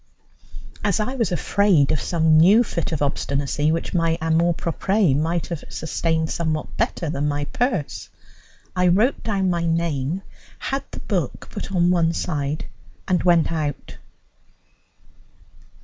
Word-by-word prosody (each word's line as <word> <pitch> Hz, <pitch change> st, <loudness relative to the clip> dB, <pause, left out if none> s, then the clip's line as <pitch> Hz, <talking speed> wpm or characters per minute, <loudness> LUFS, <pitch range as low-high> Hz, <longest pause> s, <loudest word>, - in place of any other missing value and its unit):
As 205 Hz, -2 st, +1 dB
I 215 Hz, +5 st, -1 dB
was 230 Hz, -9 st, -1 dB
afraid 180 Hz, -4 st, +3 dB
of 155 Hz, -, 0 dB
some 160 Hz, -2 st, +3 dB
new 200 Hz, +8 st, +6 dB
fit 170 Hz, -7 st, -3 dB
of 155 Hz, -3 st, -1 dB
obstinacy, 140 Hz, +1 st, 0 dB
which 165 Hz, -, -2 dB
my 165 Hz, -2 st, +1 dB
amour 165 Hz, +1 st, +2 dB
propre 190 Hz, 0 st, +1 dB
might 165 Hz, +3 st, 0 dB
have 170 Hz, -4 st, -4 dB
sustained 160 Hz, 0 st, -1 dB
somewhat 155 Hz, -2 st, -2 dB
better 170 Hz, -, -1 dB
than 145 Hz, -1 st, -1 dB
my 145 Hz, 0 st, -1 dB
purse, 230 Hz, -, -2 dB, 0.7 s
I 180 Hz, 0 st, +3 dB
wrote 210 Hz, +10 st, +3 dB
down 195 Hz, -4 st, 0 dB
my 170 Hz, -1 st, -1 dB
name, 165 Hz, +1 st, -1 dB, 0.3 s
had 270 Hz, +1 st, -3 dB
the -, -, -8 dB
book -, -, -3 dB
put -, -, -6 dB
on 175 Hz, -2 st, +3 dB
one 170 Hz, -2 st, +2 dB
side, 150 Hz, -3 st, -2 dB, 0.4 s
and 180 Hz, -2 st, +2 dB
went 170 Hz, -3 st, +3 dB
out. 150 Hz, -3 st, -4 dB
165 Hz, 140 wpm, -22 LUFS, 155-185 Hz, 0.7 s, new